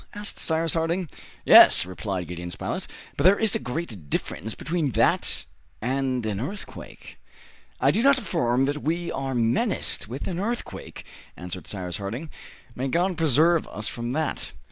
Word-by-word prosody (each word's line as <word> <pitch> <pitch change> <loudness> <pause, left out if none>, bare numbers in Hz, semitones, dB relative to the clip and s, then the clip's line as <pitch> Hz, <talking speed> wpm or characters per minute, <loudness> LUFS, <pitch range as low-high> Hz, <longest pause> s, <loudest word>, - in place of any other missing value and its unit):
asked 205 0 -4
Cyrus 160 0 +2
Harding. 170 +2 0 0.4
"Yes," - - +9
replied 95 0 -4
Gideon 85 0 -6
Spilett, 85 - -4 0.3
"but - - -1
there 190 +3 +6
is 220 -3 +2
a - - +1
great 125 - -5
difference 105 +11 -3
between 160 -6 -2
that - - +2 0.3
and 130 0 -1
an 105 -1 -2
earthquake." 195 - -8 0.6
"I - - +4
do 225 - +1
not 275 +2 +5
affirm 130 - +1
that 145 +1 -2
we 170 +3 -1
are 135 -1 -3
menaced 120 - +1
with 125 +5 -6
an 180 -2 -3
earthquake," 230 +5 -5 0.3
answered 90 -1 -7
Cyrus 90 -3 -4
Harding, 115 +11 -5 0.4
"may 130 +3 -3
God 175 +7 +1
preserve 160 +1 +3
us 105 0 -2
from 120 +1 -4
that! 155 +1 -2
135 Hz, 155 wpm, -25 LUFS, 110-170 Hz, 0.6 s, Yes